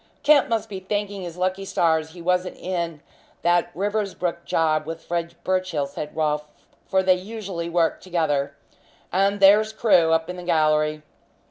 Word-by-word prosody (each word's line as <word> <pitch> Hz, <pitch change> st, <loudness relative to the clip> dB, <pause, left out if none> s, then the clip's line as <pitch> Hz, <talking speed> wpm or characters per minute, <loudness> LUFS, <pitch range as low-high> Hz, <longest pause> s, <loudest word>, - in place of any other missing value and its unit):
"Kemp 295 Hz, -2 st, +5 dB
must 225 Hz, -1 st, 0 dB
be 195 Hz, -3 st, -6 dB
thanking 205 Hz, +1 st, -3 dB
his 175 Hz, -1 st, -7 dB
lucky 185 Hz, +1 st, -1 dB
stars 160 Hz, -4 st, +1 dB
he 175 Hz, -2 st, -10 dB
wasn't 180 Hz, +1 st, 0 dB
in 170 Hz, -4 st, -3 dB, 0.4 s
that 175 Hz, 0 st, +3 dB
Riversbrook 195 Hz, -3 st, -2 dB
job 155 Hz, -1 st, +1 dB
with 165 Hz, 0 st, -6 dB
Fred 170 Hz, 0 st, -3 dB
Birchill," 185 Hz, -6 st, 0 dB
said 145 Hz, +2 st, -7 dB
Rolfe, 150 Hz, -1 st, 0 dB, 0.4 s
"for 190 Hz, -1 st, +2 dB
they 185 Hz, 0 st, +5 dB
usually 185 Hz, -3 st, -5 dB
work 170 Hz, -1 st, +1 dB
together. 155 Hz, -6 st, -1 dB, 0.6 s
And 195 Hz, +2 st, +2 dB
there's 210 Hz, +3 st, +6 dB
Crewe, 190 Hz, -7 st, +3 dB
up 160 Hz, 0 st, +2 dB
in 180 Hz, 0 st, -6 dB
the -, -, -6 dB
gallery." 155 Hz, -2 st, +1 dB
175 Hz, 155 wpm, -23 LUFS, 160-195 Hz, 0.6 s, there's